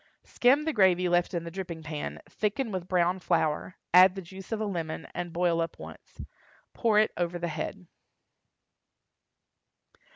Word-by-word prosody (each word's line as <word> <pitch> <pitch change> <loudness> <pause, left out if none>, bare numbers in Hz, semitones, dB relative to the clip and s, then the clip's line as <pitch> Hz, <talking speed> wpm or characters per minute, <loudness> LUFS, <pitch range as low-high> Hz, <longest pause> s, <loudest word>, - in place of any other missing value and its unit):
Skim 275 +5 +3
the 320 - 0
gravy 185 -4 +4
left 175 0 +2
in 170 -2 -2
the 170 - -7
dripping 170 -3 -6
pan, 150 -1 -5
thicken 215 +3 -2
with 185 -2 -4
brown 180 0 +1
flour, 170 -1 0 0.2
add 185 +1 +8
the 195 - -5
juice 190 +4 -11
of 225 - -1
a 215 - -1
lemon, 165 -6 -4
and 175 -1 -4
boil 170 0 +1
up 165 0 -4
once. - - -12 0.5
Pour 225 -3 +2
it 215 0 +4
over 175 0 -1
the 170 0 -3
head. 170 +4 -5
180 Hz, 160 wpm, -28 LUFS, 170-195 Hz, 0.5 s, add